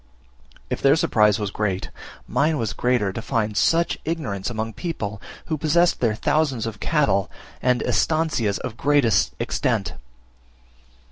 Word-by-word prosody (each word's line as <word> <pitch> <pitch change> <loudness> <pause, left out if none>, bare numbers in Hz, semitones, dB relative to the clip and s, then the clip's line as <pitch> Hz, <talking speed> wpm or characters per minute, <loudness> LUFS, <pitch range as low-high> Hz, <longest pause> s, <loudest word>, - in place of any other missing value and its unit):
If - - -2
their 140 +1 +5
surprise 105 -9 +3
was 105 -2 -3
great, 100 -3 -2 0.4
mine 155 +2 +1
was 115 -5 -2
greater, 120 -6 0
to 115 - -4
find 110 -3 -1
such 165 +9 +2
ignorance 130 - -3
among 110 -1 -4
people 105 - -5 0.2
who 155 -2 -3
possessed 170 +3 +3
their 115 -3 +1
thousands 135 -2 0
of 110 -2 -5
cattle, 120 - +1 0.3
and 125 -1 +2
"estancias" 155 -11 +1
of 110 - -6
great 145 -2 +3 0.3
extent. - - -1
120 Hz, 135 wpm, -23 LUFS, 105-155 Hz, 0.4 s, their